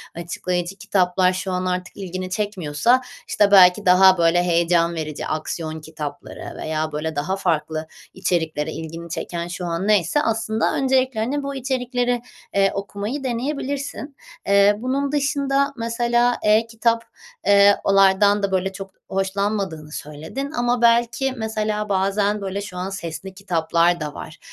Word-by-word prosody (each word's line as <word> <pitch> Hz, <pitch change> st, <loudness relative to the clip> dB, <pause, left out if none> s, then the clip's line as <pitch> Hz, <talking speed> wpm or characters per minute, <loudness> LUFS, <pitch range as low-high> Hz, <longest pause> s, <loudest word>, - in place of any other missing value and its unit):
açıklayıcı 175 Hz, +2 st, -3 dB
kitaplar 185 Hz, -3 st, +1 dB
şu 185 Hz, +1 st, -3 dB
an 180 Hz, 0 st, -1 dB
artık 180 Hz, 0 st, -3 dB
ilgini 185 Hz, -1 st, -5 dB
çekmiyorsa, 200 Hz, -4 st, -3 dB, 0.6 s
işte, 205 Hz, -1 st, +2 dB
belki 190 Hz, +1 st, +7 dB
daha, 185 Hz, +1 st, +6 dB
böyle, 170 Hz, +1 st, +3 dB
heyecan 170 Hz, 0 st, +2 dB
verici 155 Hz, -2 st, -4 dB
aksiyon 155 Hz, 0 st, -4 dB
kitapları 150 Hz, -2 st, -8 dB
veya, 155 Hz, 0 st, -2 dB
böyle, 155 Hz, +1 st, -3 dB
daha 150 Hz, +7 st, -1 dB
farklı 160 Hz, -4 st, -1 dB, 0.3 s
içeriklere 160 Hz, -3 st, -1 dB
ilgini 165 Hz, +1 st, -7 dB
çeken, 170 Hz, +1 st, -4 dB
şu 175 Hz, +1 st, -5 dB
an 170 Hz, +3 st, -2 dB
neyse, 210 Hz, -, +3 dB
aslında 225 Hz, -3 st, 0 dB
öncelikle, 260 Hz, -3 st, +1 dB
hani, 275 Hz, +6 st, -1 dB
bu 280 Hz, 0 st, -4 dB
içerikleri, 245 Hz, -2 st, -1 dB, 0.3 s
eee, 195 Hz, 0 st, +4 dB
okumayı 205 Hz, +7 st, -4 dB
deneyebilirsin. 280 Hz, +3 st, -3 dB, 0.3 s
Eee, 200 Hz, +1 st, +5 dB
bunun 270 Hz, +4 st, -1 dB
dışında, 280 Hz, -1 st, +1 dB
mesela, 240 Hz, +1 st, +1 dB
e-kitap, 225 Hz, +2 st, +2 dB, 0.4 s
eee, 200 Hz, 0 st, +6 dB
onlardan 195 Hz, +1 st, +4 dB
da, 200 Hz, -, 0 dB
böyle, 190 Hz, 0 st, 0 dB
çok 195 Hz, 0 st, -9 dB
hoşlanmadığını 195 Hz, -5 st, -2 dB
söyledin 160 Hz, -, -6 dB
ama, 240 Hz, -3 st, 0 dB
belki, 235 Hz, +3 st, +3 dB
mesela, 215 Hz, -1 st, -2 dB
bazen, 200 Hz, +2 st, +1 dB
böyle, 195 Hz, +1 st, -3 dB
şu 185 Hz, -3 st, -8 dB
an 185 Hz, +1 st, -3 dB
sesli 190 Hz, 0 st, -6 dB
kitaplar 170 Hz, -2 st, +1 dB
da 150 Hz, -1 st, -4 dB
var, 160 Hz, -, -9 dB
195 Hz, 135 wpm, -22 LUFS, 175-230 Hz, 0.6 s, belki